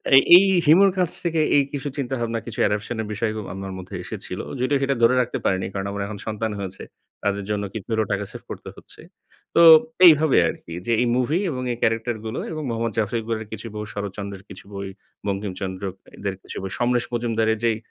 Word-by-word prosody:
এ -, -, +11 dB, 0.2 s
এই 195 Hz, -, +5 dB, 0.2 s
হিমুর 190 Hz, +6 st, +6 dB
কাছ 180 Hz, -3 st, +1 dB
থেকে 165 Hz, -2 st, +1 dB
এই 140 Hz, -, +5 dB
কিছু 145 Hz, 0 st, -3 dB
চিন্তাভাবনা, 120 Hz, -4 st, -2 dB
কিছু 115 Hz, -, -7 dB
অ্যাডাপশন 105 Hz, +3 st, -1 dB
এর 105 Hz, -, -5 dB
বিষয় 110 Hz, +1 st, -1 dB, 0.2 s
আমার 95 Hz, 0 st, -6 dB
মধ্যে 95 Hz, +1 st, -8 dB
এসেছিল। 95 Hz, -1 st, -7 dB, 0.2 s
যদিও 140 Hz, +2 st, +2 dB
সেটা 135 Hz, 0 st, +1 dB
ধরে 125 Hz, +2 st, +6 dB
রাখতে 125 Hz, -, -2 dB
পারিনি, 95 Hz, -1 st, +1 dB
কারণ 100 Hz, 0 st, -3 dB
আমার 100 Hz, 0 st, -4 dB
এখন 105 Hz, -1 st, -6 dB
সন্তান 110 Hz, 0 st, -2 dB
হয়েছে। 95 Hz, -1 st, -6 dB, 0.4 s
তাদের 100 Hz, 0 st, 0 dB
জন্য 105 Hz, -1 st, -1 dB
কিছু 110 Hz, -4 st, -6 dB
হলেও 110 Hz, -2 st, +1 dB
টাকা 100 Hz, +1 st, -2 dB
সেভ -, -, -9 dB
করতে -, -, -7 dB
হচ্ছে। -, -, -15 dB, 0.5 s
তো -, -, +6 dB, 0.5 s
এইভাবে 155 Hz, -3 st, +6 dB
আরকি 85 Hz, -, -8 dB
যে, -, -, +1 dB
এই 125 Hz, -, +2 dB
মুভি 135 Hz, +7 st, +1 dB
এবং 130 Hz, -5 st, -3 dB
এই -, -, -7 dB
ক্যারেক্টার 115 Hz, +1 st, +1 dB
গুলো 110 Hz, +3 st, -3 dB
এবং 155 Hz, -, -4 dB
মোহাম্মদ 115 Hz, -1 st, -2 dB
জাফর 110 Hz, +2 st, 0 dB
ইকবালের 110 Hz, -1 st, -4 dB
কিছু 110 Hz, +2 st, -6 dB
বই, 105 Hz, 0 st, -4 dB
শরৎচন্দ্রের 100 Hz, -1 st, -6 dB
কিছু 95 Hz, -, -11 dB
বই, 100 Hz, 0 st, -5 dB, 0.4 s
বঙ্কিমচন্দ্র 95 Hz, -1 st, -4 dB, 0.3 s
এদের 100 Hz, -1 st, -3 dB
কিছু -, -, -8 dB
বই, 95 Hz, -, -5 dB
সমরেশ 120 Hz, 0 st, +1 dB
মজুমদারের 115 Hz, -2 st, +1 dB
যেই, 115 Hz, -2 st, +2 dB
110 Hz, 200 wpm, -23 LUFS, 100-125 Hz, 0.5 s, এ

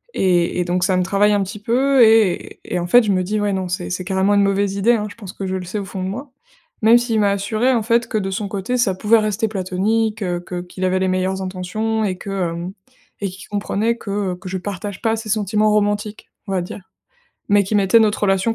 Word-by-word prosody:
et 180 Hz, -1 st, +2 dB
et 180 Hz, -, 0 dB
donc, 180 Hz, +1 st, 0 dB
ça 185 Hz, -1 st, +2 dB
me 180 Hz, -, +2 dB
travaille 200 Hz, +3 st, +2 dB
un 200 Hz, -, +2 dB
petit 200 Hz, +2 st, -7 dB
peu 260 Hz, +4 st, +3 dB
et 220 Hz, -5 st, +3 dB
et 180 Hz, -, -2 dB
en 175 Hz, -, -3 dB
fait, 245 Hz, +6 st, +6 dB
je 210 Hz, -, +1 dB
me 185 Hz, -1 st, +2 dB
dis: 210 Hz, +4 st, -1 dB
«Ouais, 205 Hz, -1 st, 0 dB
non, 190 Hz, -1 st, -2 dB
c'est 180 Hz, 0 st, -3 dB
c'est 180 Hz, 0 st, -3 dB
carrément 190 Hz, +2 st, +1 dB
une 200 Hz, -, +4 dB
mauvaise 200 Hz, 0 st, +1 dB
idée», 205 Hz, +4 st, +3 dB
hein. 210 Hz, -2 st, -1 dB
Je -, -, -12 dB
pense 200 Hz, -4 st, -10 dB
que 195 Hz, -, -6 dB
je 185 Hz, -, -2 dB
le 185 Hz, -1 st, -4 dB
sais 190 Hz, +4 st, -4 dB
au 200 Hz, -, -5 dB
fond 190 Hz, -1 st, -5 dB
de 185 Hz, -, -2 dB
moi. 260 Hz, +7 st, -7 dB, 0.5 s
Même 225 Hz, +2 st, +7 dB
s'il 240 Hz, -2 st, 0 dB
m'a 205 Hz, -1 st, +3 dB
assuré, 215 Hz, +5 st, 0 dB
en 230 Hz, -, +1 dB
fait, 235 Hz, +1 st, +2 dB
que 220 Hz, -, -1 dB
de 195 Hz, -2 st, -2 dB
son 200 Hz, +2 st, -3 dB
côté 200 Hz, +5 st, -2 dB
ça 235 Hz, -6 st, +2 dB
pouvait 220 Hz, +4 st, +3 dB
rester 215 Hz, +1 st, 0 dB
platonique, 210 Hz, +3 st, -1 dB
heu, 175 Hz, -1 st, -1 dB
que 175 Hz, 0 st, -5 dB
qu'il 180 Hz, +1 st, -8 dB
avait 185 Hz, 0 st, +1 dB
les 190 Hz, -, +1 dB
meilleures 185 Hz, +1 st, -1 dB
intentions 195 Hz, +4 st, -2 dB
et 190 Hz, -3 st, -1 dB
que, 200 Hz, -, -8 dB, 0.2 s
hem 170 Hz, +3 st, -5 dB, 0.5 s
et 200 Hz, -, -1 dB
qu'il 190 Hz, +2 st, -12 dB
comprenait 210 Hz, +2 st, -1 dB
que, 205 Hz, -, -9 dB, 0.2 s
heu, -, -, -5 dB
que 185 Hz, +1 st, -9 dB
je 190 Hz, -, -2 dB
partage 200 Hz, +1 st, -6 dB
pas 225 Hz, 0 st, +1 dB
ses 220 Hz, -1 st, -7 dB
sentiments 215 Hz, 0 st, +1 dB
romantiques, 205 Hz, 0 st, -1 dB, 0.2 s
on -, -, -4 dB
va 185 Hz, -2 st, 0 dB
dire 180 Hz, -, -7 dB, 0.7 s
mais 205 Hz, 0 st, +4 dB
qu'il 210 Hz, +3 st, 0 dB
mettait 200 Hz, +3 st, +5 dB
notre 215 Hz, -1 st, +1 dB
relation, 195 Hz, +3 st, +2 dB
200 Hz, 255 wpm, -20 LUFS, 185-220 Hz, 0.7 s, Même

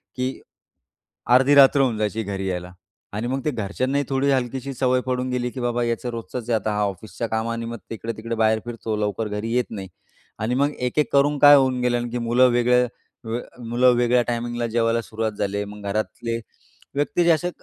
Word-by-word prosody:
की 130 Hz, 0 st, -3 dB, 1.0 s
अर्धी 135 Hz, +3 st, +5 dB
रात्र 140 Hz, 0 st, +7 dB
होऊन 125 Hz, -5 st, +1 dB
जायची 105 Hz, +1 st, -1 dB
घरी 95 Hz, -1 st, -4 dB
यायला 90 Hz, -1 st, -4 dB, 0.4 s
आणि 110 Hz, +4 st, -2 dB
मग 135 Hz, +2 st, -2 dB
ते 150 Hz, -, +2 dB
घरच्यांनाही 130 Hz, +5 st, -1 dB
थोडी 135 Hz, +1 st, +1 dB
हलकीशी 130 Hz, +1 st, -1 dB
सवय 130 Hz, 0 st, +1 dB
पडून 130 Hz, 0 st, -1 dB
गेली, 125 Hz, -1 st, -1 dB
की 130 Hz, -, -7 dB
बाबा 120 Hz, 0 st, 0 dB
याचं 120 Hz, +1 st, -2 dB
रोजचंच 115 Hz, +1 st, -6 dB
आहे 115 Hz, -, +3 dB
आता 110 Hz, +1 st, -2 dB
हा 105 Hz, -, 0 dB
ऑफिसच्या 105 Hz, +4 st, -4 dB
कामानिमित्त 115 Hz, +1 st, -3 dB
इकडे-तिकडे 115 Hz, +1 st, -5 dB
बाहेर 110 Hz, 0 st, +2 dB
फिरतो, 115 Hz, -2 st, -4 dB
लवकर 105 Hz, +1 st, -1 dB
घरी 105 Hz, +2 st, -4 dB
येत 125 Hz, 0 st, +1 dB
नाही 100 Hz, -3 st, -6 dB, 0.5 s
आणि 115 Hz, +3 st, -1 dB
मग 140 Hz, +2 st, +2 dB
एक-एक 125 Hz, +4 st, 0 dB
करून 145 Hz, +1 st, +3 dB
काय 145 Hz, 0 st, +9 dB
होऊन 130 Hz, -2 st, +3 dB
गेलं 125 Hz, 0 st, +2 dB
आणि 120 Hz, 0 st, -3 dB
की 125 Hz, -, -2 dB
मुलं 120 Hz, +2 st, +4 dB
वेगळ्या 125 Hz, +1 st, +3 dB, 0.8 s
मुलं 120 Hz, +2 st, +3 dB
वेगळ्या 120 Hz, 0 st, +3 dB
टायमिंगला 120 Hz, 0 st, -2 dB
जेवायला 115 Hz, 0 st, +1 dB
सुरुवात 110 Hz, -1 st, -3 dB
झाले. 100 Hz, 0 st, -2 dB
मग 105 Hz, 0 st, -10 dB
घरातले 110 Hz, +2 st, -2 dB, 0.6 s
व्यक्ती 145 Hz, +4 st, +1 dB
जे 170 Hz, -, +5 dB
असे 170 Hz, +2 st, +1 dB
120 Hz, 185 wpm, -23 LUFS, 110-130 Hz, 1.0 s, काय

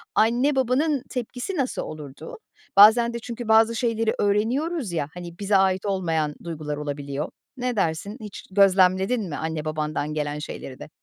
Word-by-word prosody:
anne, 245 Hz, +6 st, +3 dB
babanın 265 Hz, +2 st, +1 dB
tepkisi 250 Hz, -, -4 dB
nasıl 260 Hz, -2 st, -1 dB
olurdu? 150 Hz, 0 st, -8 dB, 0.4 s
Bazen 230 Hz, +3 st, +7 dB
de 235 Hz, -, -3 dB
çünkü 235 Hz, 0 st, -7 dB
bazı 225 Hz, +1 st, +5 dB
şeyleri 225 Hz, -1 st, 0 dB
öğreniyoruz, 235 Hz, -, 0 dB
ya, 160 Hz, -4 st, -1 dB
hani, 175 Hz, -1 st, -9 dB
bize 205 Hz, 0 st, +1 dB
ait 190 Hz, 0 st, +2 dB
olmayan 165 Hz, -6 st, 0 dB
duygular 155 Hz, -3 st, -5 dB
olabiliyor. 145 Hz, 0 st, -4 dB, 0.3 s
Ne 250 Hz, -1 st, -2 dB
dersin 195 Hz, +3 st, -1 dB
hiç 210 Hz, -2 st, -8 dB
gözlemledin 190 Hz, +2 st, +3 dB
mi 145 Hz, -, -4 dB
anne, 160 Hz, -1 st, -3 dB
babandan 155 Hz, -1 st, -2 dB
gelen 150 Hz, -1 st, -2 dB
şeyleri 135 Hz, -3 st, -7 dB
de? -, -, -9 dB
195 Hz, 150 wpm, -24 LUFS, 155-235 Hz, 0.4 s, Bazen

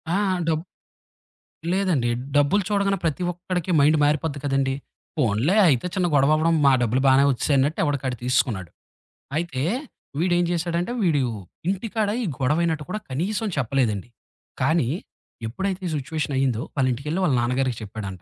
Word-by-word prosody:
ఆ! -, -, +3 dB, 0.3 s
డబ్ 160 Hz, -1 st, +1 dB, 1.1 s
లేదండి. 180 Hz, -11 st, +1 dB, 0.3 s
డబ్బులు 145 Hz, +8 st, +4 dB
చూడగానే 200 Hz, -1 st, +1 dB
ప్రతి 165 Hz, +2 st, 0 dB
ఒక్కడికి 180 Hz, 0 st, -3 dB
మైండ్ 150 Hz, +2 st, +5 dB
మారిపోద్ది 145 Hz, 0 st, +1 dB
కదండీ. 135 Hz, -1 st, +1 dB, 0.4 s
పోన్లే 125 Hz, -, +2 dB
అయితే 130 Hz, -3 st, +2 dB
చిన్న 185 Hz, -2 st, +1 dB
గొడవవ్వడం 155 Hz, +4 st, +4 dB
మా 140 Hz, -, +7 dB
డబ్బులు 120 Hz, +2 st, +1 dB
బానే 135 Hz, +1 st, +6 dB
వచ్చేశాయి 140 Hz, +2 st, +1 dB
అన్నట్టు 145 Hz, +4 st, +1 dB
ఎవడికాడు 140 Hz, -4 st, -1 dB
తీసుకున్నాడు. 120 Hz, -, 0 dB, 0.7 s
అయితే 160 Hz, -6 st, -2 dB, 0.6 s
వీడేం 175 Hz, +1 st, +2 dB
జేశాడంటే 175 Hz, +3 st, -1 dB
వీడు 160 Hz, -7 st, +3 dB, 0.5 s
ఇంటికాడ 210 Hz, +2 st, -1 dB
ఈ -, -, -1 dB
గొడవయినట్టు 155 Hz, +3 st, +1 dB
కూడా 215 Hz, -, -2 dB
కనీసం 195 Hz, -, -1 dB
చెప్పలేదండి. 120 Hz, -5 st, 0 dB, 0.5 s
కానీ, 140 Hz, -2 st, +2 dB, 0.6 s
ఎప్పుడైతే 190 Hz, -, -3 dB
ఈ -, -, -4 dB
సిచ్యువేషన్ 145 Hz, +1 st, -3 dB
అయిందో 130 Hz, -4 st, +1 dB
వాళ్ళింటికెళ్ళి 140 Hz, +6 st, 0 dB
వాళ్ళ 150 Hz, -, +2 dB
నాన్నగారికి 125 Hz, 0 st, 0 dB
చెప్పాడంట, 100 Hz, -3 st, -7 dB
145 Hz, 130 wpm, -24 LUFS, 130-175 Hz, 1.1 s, మా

